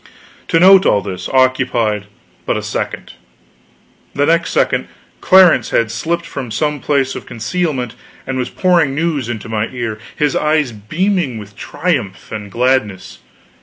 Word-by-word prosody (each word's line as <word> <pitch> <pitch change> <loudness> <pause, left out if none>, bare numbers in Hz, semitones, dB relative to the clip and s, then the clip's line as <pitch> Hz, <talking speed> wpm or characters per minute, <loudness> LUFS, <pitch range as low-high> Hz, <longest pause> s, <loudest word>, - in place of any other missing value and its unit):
To 165 - +2
note 190 +2 +7
all 100 - +3
this, 95 -2 -6
occupied 125 -5 +1 0.4
but - - +1
a - - -4
second. - - -4 1.0
The 145 - +2
next 165 +1 +2
second - - +1 0.3
Clarence 185 -2 +5
had 115 -2 +1
slipped 170 +4 -2
from 135 -4 -6
some 150 +7 -1
place 135 -1 0
of - - -8
concealment 125 0 -2 0.3
and 130 - -3
was 125 0 -2
pouring 170 -7 +2
news 150 -6 -1
into 115 -1 -5
my 110 0 -1
ear, 115 -4 -5 0.2
his 150 -2 0
eyes 150 -4 +1
beaming 155 - -1
with 105 -1 -10
triumph 135 - -3
and 105 -2 -6
gladness. 120 -6 -1
130 Hz, 145 wpm, -16 LUFS, 110-160 Hz, 1.0 s, note